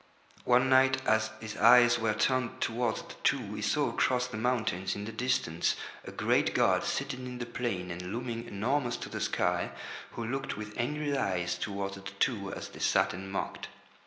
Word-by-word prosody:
One 125 Hz, +1 st, +4 dB
night 130 Hz, 0 st, +5 dB
as 110 Hz, 0 st, +3 dB
his 110 Hz, -1 st, -6 dB
eyes 120 Hz, +1 st, +7 dB
were 110 Hz, -2 st, +1 dB
turned 130 Hz, +1 st, +1 dB
towards 115 Hz, 0 st, -1 dB
the -, -, -11 dB
Two, 100 Hz, -, +1 dB
he 105 Hz, -, -5 dB
saw 145 Hz, +5 st, +1 dB
across 125 Hz, +1 st, +2 dB
the 125 Hz, -, -7 dB
mountains 110 Hz, -5 st, 0 dB
in 100 Hz, -, -5 dB
the 115 Hz, -, -5 dB
distance 110 Hz, -8 st, 0 dB, 0.3 s
a -, -, -8 dB
great -, -, +1 dB
god -, -, +3 dB
seated 135 Hz, -2 st, -2 dB
in 125 Hz, -1 st, -6 dB
the 120 Hz, -, -4 dB
plain 115 Hz, -7 st, -3 dB
and 90 Hz, +2 st, -5 dB
looming 115 Hz, 0 st, -4 dB
enormous 120 Hz, +4 st, 0 dB
to -, -, -7 dB
the -, -, -5 dB
sky, -, -, 0 dB, 0.4 s
who 115 Hz, -, -4 dB
looked 135 Hz, +4 st, -3 dB
with 105 Hz, 0 st, -7 dB
angry 145 Hz, +4 st, -1 dB
eyes 90 Hz, -9 st, 0 dB
towards 100 Hz, -1 st, -3 dB
the -, -, -10 dB
Two 100 Hz, +1 st, -1 dB
as -, -, -6 dB
they -, -, -12 dB
sat -, -, +3 dB
and 95 Hz, +1 st, -7 dB
mocked. 95 Hz, -, -3 dB
115 Hz, 190 wpm, -30 LUFS, 100-125 Hz, 0.4 s, eyes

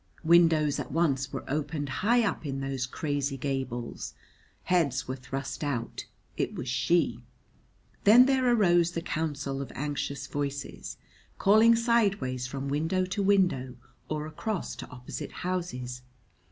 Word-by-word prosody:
Windows 160 Hz, -3 st, +4 dB
at -, -, -5 dB
once 135 Hz, -4 st, +1 dB
were -, -, -6 dB
opened 145 Hz, +1 st, -2 dB
high 230 Hz, -, +2 dB
up 200 Hz, -, -2 dB
in 135 Hz, -3 st, -3 dB
those 135 Hz, -2 st, -2 dB
crazy 140 Hz, 0 st, -2 dB
gables; 130 Hz, -3 st, -4 dB, 0.5 s
heads 155 Hz, -8 st, +1 dB
were 130 Hz, -, -2 dB
thrust 135 Hz, +3 st, -5 dB
out: 135 Hz, -6 st, -3 dB, 0.3 s
it -, -, -2 dB
was -, -, -5 dB
she. 125 Hz, -1 st, +1 dB, 0.8 s
Then 235 Hz, +5 st, +8 dB
there 260 Hz, -2 st, +3 dB
arose 175 Hz, -6 st, +4 dB
the 170 Hz, -, -3 dB
counsel 140 Hz, -5 st, -2 dB
of 140 Hz, -, -6 dB
anxious 145 Hz, -1 st, -3 dB
voices, 140 Hz, -1 st, -4 dB, 0.4 s
calling 220 Hz, +3 st, +6 dB
sideways 200 Hz, -, +1 dB
from 135 Hz, +1 st, -4 dB
window 160 Hz, +6 st, 0 dB
to 195 Hz, +3 st, -2 dB
window 180 Hz, -11 st, +2 dB, 0.3 s
or 150 Hz, -1 st, -2 dB
across 185 Hz, +6 st, -4 dB
to -, -, -8 dB
opposite 125 Hz, -1 st, -7 dB
houses. 125 Hz, -9 st, -4 dB
145 Hz, 135 wpm, -28 LUFS, 135-180 Hz, 0.8 s, Then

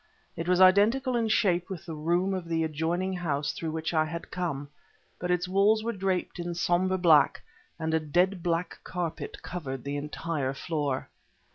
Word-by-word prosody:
It 165 Hz, +1 st, -4 dB
was 180 Hz, 0 st, +3 dB
identical 215 Hz, +8 st, +5 dB
in 230 Hz, -1 st, +1 dB
shape 185 Hz, -5 st, +2 dB
with 180 Hz, -4 st, -6 dB
the 165 Hz, -, -6 dB
room 175 Hz, +5 st, 0 dB
of 185 Hz, -3 st, -4 dB
the 165 Hz, -1 st, 0 dB
adjoining 165 Hz, +4 st, -1 dB
house 150 Hz, -5 st, -1 dB
through 165 Hz, -, -4 dB
which 160 Hz, +1 st, -3 dB
I 155 Hz, -1 st, +3 dB
had 165 Hz, +2 st, -6 dB
come, 145 Hz, -6 st, -3 dB, 0.5 s
but 180 Hz, -, -3 dB
its 180 Hz, 0 st, +1 dB
walls 200 Hz, +4 st, +3 dB
were 235 Hz, +1 st, -1 dB
draped 190 Hz, -3 st, -2 dB
in 175 Hz, 0 st, -3 dB
somber 180 Hz, +2 st, +1 dB
black 160 Hz, -5 st, +4 dB, 0.3 s
and 160 Hz, -1 st, -2 dB
a 160 Hz, -, +3 dB
dead 175 Hz, +5 st, +1 dB
black 170 Hz, +1 st, -1 dB
carpet 175 Hz, -3 st, -5 dB
covered 135 Hz, -8 st, -5 dB
the 140 Hz, +1 st, -3 dB
entire 150 Hz, -2 st, -3 dB
floor. 145 Hz, -4 st, -2 dB
175 Hz, 175 wpm, -28 LUFS, 160-185 Hz, 0.5 s, identical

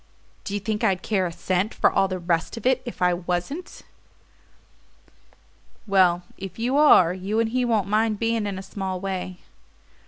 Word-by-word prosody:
"Do 200 Hz, -, -3 dB
you -, -, -1 dB
think 215 Hz, +2 st, -3 dB
I'd 190 Hz, -4 st, +1 dB
care 190 Hz, -4 st, 0 dB
a -, -, -6 dB
cent 185 Hz, +4 st, -1 dB
for -, -, +3 dB
all 195 Hz, -, +2 dB
the 185 Hz, -1 st, -3 dB
rest 170 Hz, +3 st, -1 dB
of 230 Hz, -, -8 dB
it 255 Hz, 0 st, +3 dB
if 240 Hz, -6 st, -5 dB
I 180 Hz, 0 st, +4 dB
wasn't?" 180 Hz, -, -4 dB, 2.0 s
"Well, 185 Hz, -3 st, +3 dB, 0.2 s
if 195 Hz, -1 st, -8 dB
you 245 Hz, +4 st, -1 dB
are, 280 Hz, -, +6 dB
you 195 Hz, +4 st, -2 dB
and 230 Hz, -1 st, +1 dB
he 250 Hz, +2 st, 0 dB
won't 225 Hz, -5 st, +1 dB
mind 215 Hz, +1 st, +1 dB
beginning 225 Hz, -1 st, 0 dB
in 195 Hz, -2 st, -4 dB
a 190 Hz, -, -7 dB
small 190 Hz, -2 st, -4 dB
way." 185 Hz, -1 st, -5 dB
195 Hz, 180 wpm, -24 LUFS, 185-225 Hz, 2.0 s, are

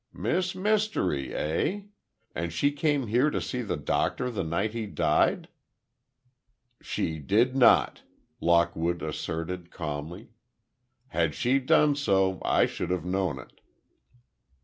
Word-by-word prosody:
"Miss 175 Hz, -, -1 dB
Mystery, 190 Hz, -, 0 dB
eh? 155 Hz, -, -1 dB, 0.5 s
And 85 Hz, 0 st, -3 dB
she 140 Hz, -, +1 dB
came 145 Hz, -2 st, 0 dB
here 120 Hz, +7 st, +2 dB
to -, -, -2 dB
see 125 Hz, -, -3 dB
the 105 Hz, -, -3 dB
Doctor 125 Hz, -, -1 dB
the 110 Hz, -, -2 dB
night 90 Hz, +7 st, -1 dB
he 115 Hz, -2 st, -3 dB
died?" -, -, +1 dB, 1.3 s
"She 80 Hz, -1 st, -3 dB
did 115 Hz, -, +2 dB
not!" 130 Hz, -3 st, +4 dB, 0.4 s
Lockwood 85 Hz, 0 st, +1 dB
asserted, 85 Hz, +3 st, -4 dB
calmly. 85 Hz, +8 st, -6 dB, 0.8 s
"Had 85 Hz, -8 st, 0 dB
she 130 Hz, +3 st, +2 dB
done 145 Hz, +2 st, +3 dB
so, 95 Hz, -9 st, +1 dB
I -, -, +3 dB
should -, -, -4 dB
have 90 Hz, -2 st, -2 dB
known 90 Hz, -5 st, -1 dB
it." 65 Hz, -, -14 dB
95 Hz, 125 wpm, -27 LUFS, 85-130 Hz, 1.3 s, not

